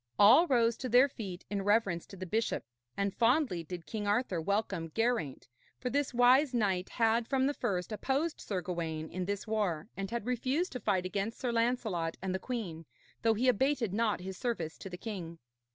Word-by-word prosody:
All 230 +12 +7
rose 235 -4 +3
to 255 - -4
their 250 +4 +6
feet 195 -8 -7
in 200 -1 -1
reverence 200 -4 +1
to 195 - -11
the 185 - -5
bishop, 220 +5 -1 0.3
and 200 -1 0
fondly 235 - +2
did 170 0 -7
King 210 -2 -4
Arthur 205 -5 +1
welcome 190 -3 -1
Geraint, 225 - 0 0.3
for 250 - -3
this 285 0 0
wise 255 +2 +5
knight 195 -5 +1
had 230 0 +2
from 265 -1 +2
the 285 - +1
first 180 -8 -2
opposed 275 +9 -1
Sir 190 -3 -2
Gawaine 160 -3 -3
in 185 0 -3
this 200 +1 -3
war, 205 -6 -1
and 195 0 -4
had 235 -1 -3
refused 260 +8 0
to 250 - -4
fight 195 -4 0
against 200 +4 -3
Sir 250 -2 -1
Lancelot 230 -8 0
and 190 -1 -3
the 190 - -1
queen, 180 - -5 0.3
though 225 0 +3
he 245 +5 +1
abated 250 -3 +2
not 215 -3 +1
his 190 0 -6
service 225 -11 -2
to 195 - -7
the 180 - -7
king. 180 -6 -6
215 Hz, 195 wpm, -32 LUFS, 185-245 Hz, 0.3 s, All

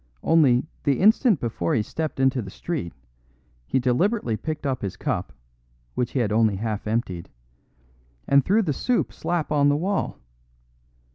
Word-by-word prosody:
Only, 145 -6 +4 0.2
the 140 -3 +1
instant 215 - +4
before 110 -8 -1
he 110 - +1
stepped 150 +5 -4
into 135 -1 +2
the 100 - -7
street 140 - -4 0.8
he - - +1
deliberately 130 - +1
picked 155 +5 -5
up 130 -2 -1
his 100 -3 -4
cup, - - -2 0.6
which 120 - -2
he 135 - 0
had 110 -3 0
only 110 -1 +3
half 105 +1 -3
emptied, 100 -6 -2 1.0
and 140 0 +5
threw 215 - +3
the 155 -6 0
soup 245 - 0
slap 170 -4 -2
on 145 -1 +4
the 145 - +2
wall. 190 +5 -1
135 Hz, 155 wpm, -24 LUFS, 115-165 Hz, 1.0 s, and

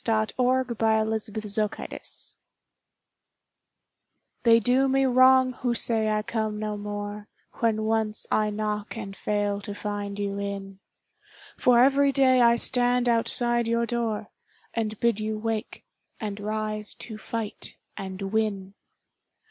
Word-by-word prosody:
OPPORTUNITY 220 -2 0 2.4
They 230 -1 +6
do 255 +4 +3
me 270 0 +2
wrong 255 0 +5
who 245 -1 -1
say 225 -2 0
I 215 0 0
come 215 -1 -2
no 210 0 -3
more 205 0 -6 0.3
When 220 -2 +1
once 220 -1 0
I 215 0 +2
knock 210 0 -3
and 195 -3 -6
fail 205 -1 -1
to 205 0 -7
find 205 -1 -4
you 200 -1 -2
in; 195 -1 -5 0.8
For 245 -1 +5
every 280 +1 +4
day 260 -2 +4
I 235 0 +6
stand 245 +1 +2
outside 240 0 +3
your 235 0 +1
door, 225 -3 -2 0.4
And 220 -2 -2
bid 235 -3 +2
you 215 0 -2
wake, 225 +1 -4 0.3
and 210 -2 -4
rise 215 0 -3
to 220 -2 -8
fight 225 -1 -5 0.2
and 190 -1 -6
win. 200 -3 -1
220 Hz, 120 wpm, -26 LUFS, 210-235 Hz, 2.4 s, They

